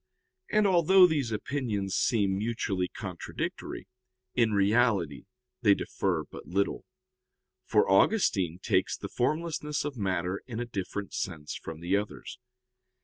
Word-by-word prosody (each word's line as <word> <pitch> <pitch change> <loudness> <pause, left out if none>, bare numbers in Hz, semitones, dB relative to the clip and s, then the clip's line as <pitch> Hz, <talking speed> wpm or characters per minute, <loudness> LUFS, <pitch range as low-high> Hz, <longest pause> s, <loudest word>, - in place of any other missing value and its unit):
And 215 0 +3
although 185 0 +6
these 145 -9 0
opinions 105 -5 -2
seem 100 -2 +2
mutually 100 -3 -1
contradictory, 95 -2 -5 0.5
in 115 -3 +3
reality 100 - +2 0.4
they 105 -5 +6
differ 85 -7 -1
but - - -11
little; 100 +3 -1 0.8
for - - +3
Augustine 95 - +3
takes - - 0
the - - -7
formlessness 150 +2 -1
of 145 -3 -4
matter 95 -2 -1
in 115 -3 -5
a 120 - -2
different 100 -2 -5
sense 80 -5 -4
from 80 0 -7
the 90 +3 +1
others. 105 +4 -6
105 Hz, 125 wpm, -29 LUFS, 95-125 Hz, 0.8 s, although